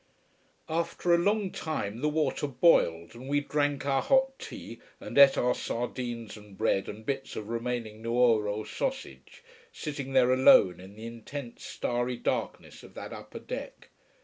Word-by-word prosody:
After 170 +2 0
a - - +6
long 205 +1 +1
time 115 -8 -4
the 150 - +2
water 150 -1 0
boiled, 120 - +3
and 125 +3 -10
we 145 0 +3
drank 145 -1 -1
our 135 -1 +2
hot 265 0 +2
tea - - -9 0.2
and - - -8
ate 140 -1 +8
our 125 0 +2
sardines 120 -1 -4
and 105 -2 -14
bread 95 - +1
and 110 +1 -9
bits 135 0 -3
of 110 0 -6
remaining 115 -2 -3
Nuoro 115 -3 +2
sausage, - - -5 0.3
sitting 140 - -5
there 130 -1 +5
alone 130 -8 +6
in 95 +2 -12
the 110 +1 -9
intense 115 +2 -8
starry 120 0 -2
darkness - - -3
of - - -15
that - - -7
upper - - -9
deck. - - -7
125 Hz, 155 wpm, -29 LUFS, 115-145 Hz, 0.3 s, ate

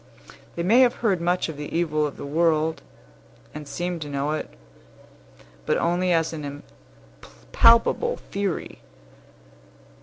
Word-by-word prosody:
They 170 - -2
may 220 +8 +4
have 250 -1 +5
heard 190 -5 +2
much 175 +1 0
of 160 -3 -7
the 150 0 -7
evil 155 -3 0
of 145 - -10
the - - -7
world, 160 +1 +1 0.7
and 150 -1 -8
seem 175 +1 -4
to 150 -2 -6
know 140 +1 -2
it, 155 - -3 1.2
but - - +2
only 180 +2 0
as 165 -1 +1
an 145 -2 -7 0.6
impalpable 230 - +3
theory. 195 -4 -4
165 Hz, 130 wpm, -24 LUFS, 150-180 Hz, 1.2 s, have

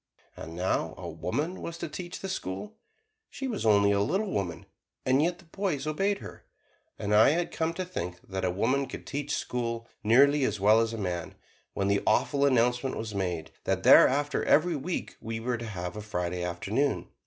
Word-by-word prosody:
And 80 +1 -8
now 90 +2 -1
a 90 - -7
woman 125 - -3
was 170 0 -5
to 170 - -4
teach 175 +3 -7
the 195 - -4
school: 100 - -4 0.6
she 270 - -5
was 215 - -2
only 100 -1 +5
a 100 - +2
little 195 - 0
woman 90 -4 -3 0.4
and 130 +2 +4
yet 175 +2 +1
the - - -18
boys 165 -5 -2
obeyed 195 +7 0
her, - - -11 0.5
and 105 0 -2
I 105 +4 +7
had 170 +4 0
come 160 0 -1
to 185 - -3
think 90 - -5
that 95 0 -4
a 90 - +2
woman 125 +9 +1
could - - -8
teach 145 +1 -2
school 115 -1 -3 0.2
nearly 140 +6 +5
as 105 -5 0
well 105 +3 +5
as 115 0 0
a 115 - -5
man, 90 -5 -3 0.4
when 100 - 0
the 100 0 +2
awful 140 -1 +3
announcement 125 0 +2
was 110 -1 -5
made 90 -5 -2
that - - 0
thereafter 145 +2 +6
every 170 +2 +3
week 160 +5 -4
we 110 0 -4
were 120 +1 -2
to 115 - -5
have 90 -3 -5
a 105 - -5
Friday 90 -3 -3
Afternoon. 100 +11 -1
115 Hz, 195 wpm, -28 LUFS, 100-150 Hz, 0.6 s, I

